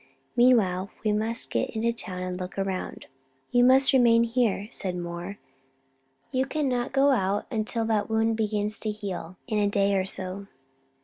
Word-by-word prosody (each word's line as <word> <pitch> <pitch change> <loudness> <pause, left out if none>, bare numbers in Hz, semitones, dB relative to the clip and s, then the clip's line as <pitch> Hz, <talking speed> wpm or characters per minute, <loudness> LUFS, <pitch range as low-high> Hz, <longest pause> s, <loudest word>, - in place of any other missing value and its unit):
Meanwhile, 205 -7 +3
we 215 - +2
must 220 +2 -1
get - - 0
into 230 +1 0
town 185 -5 -4
and 180 0 -4
look 185 +1 -7
around." 195 -1 -3 0.5
"You 245 0 +4
must 265 +2 +5
remain 235 -3 +5
here," 230 -4 0
said 185 -6 -2
Moore. 175 +3 -6 0.9
"You 260 0 0
cannot 260 -4 -1
go 275 +1 +4
out 200 -4 0
until 225 +1 -1
that 220 -1 0
wound 225 0 +1
begins 210 -1 -1
to 215 - -3
heal 185 -4 -6
in 215 -4 -1
a 205 - +2
day 200 0 +2
or 190 -1 +1
so." 190 +1 -3
215 Hz, 165 wpm, -26 LUFS, 190-235 Hz, 0.9 s, must